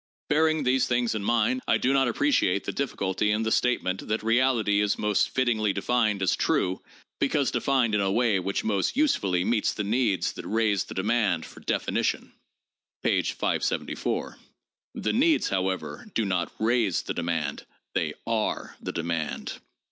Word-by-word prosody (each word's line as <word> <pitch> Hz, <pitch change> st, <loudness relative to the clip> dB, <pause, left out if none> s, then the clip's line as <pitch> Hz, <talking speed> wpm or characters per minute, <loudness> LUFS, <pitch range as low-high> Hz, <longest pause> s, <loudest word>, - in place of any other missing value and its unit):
Bearing 155 Hz, 0 st, +2 dB
these 130 Hz, 0 st, +2 dB
things 120 Hz, -1 st, +1 dB
in 110 Hz, -2 st, -3 dB
mind, 235 Hz, -, +1 dB
I -, -, +4 dB
do 130 Hz, -, +1 dB
not 135 Hz, -2 st, +3 dB
appreciate 120 Hz, -7 st, +1 dB
the -, -, -3 dB
difficulty 100 Hz, -7 st, -1 dB
in 105 Hz, +1 st, +1 dB
the 110 Hz, -, -1 dB
statement 105 Hz, -7 st, 0 dB
that 110 Hz, 0 st, -1 dB
reality 115 Hz, -3 st, +2 dB
is 105 Hz, -1 st, +1 dB
most 105 Hz, -1 st, +1 dB
fittingly 110 Hz, -5 st, +1 dB
denned 105 Hz, -1 st, +1 dB
as 95 Hz, -, +2 dB
true 90 Hz, +1 st, 0 dB, 0.4 s
'because 140 Hz, 0 st, +1 dB
defined 130 Hz, -5 st, +1 dB
in 105 Hz, -, +2 dB
a 95 Hz, -1 st, +1 dB
way 115 Hz, -3 st, +2 dB
which 95 Hz, +2 st, -2 dB
most 105 Hz, -, 0 dB
usefully 100 Hz, -, +2 dB
meets 110 Hz, -1 st, +1 dB
the 105 Hz, -, -2 dB
needs 105 Hz, -5 st, +1 dB
that -, -, -8 dB
raise 105 Hz, -3 st, +1 dB
the -, -, -9 dB
demand 100 Hz, -4 st, +1 dB
for -, -, -13 dB
definition' -, -, -1 dB, 0.7 s
(p. -, -, +3 dB
574, -, -, -2 dB, 0.6 s
the -, -, -1 dB
'needs,' 305 Hz, +6 st, +3 dB
however, 95 Hz, -, -2 dB
do 115 Hz, -, +1 dB
not 90 Hz, -3 st, -1 dB
'raise' 110 Hz, -4 st, +1 dB
the -, -, -3 dB
demand, 85 Hz, -4 st, -3 dB, 0.3 s
they -, -, -1 dB
are -, -, -2 dB
the -, -, -4 dB
demand). 85 Hz, -2 st, -3 dB
110 Hz, 160 wpm, -26 LUFS, 95-125 Hz, 0.7 s, I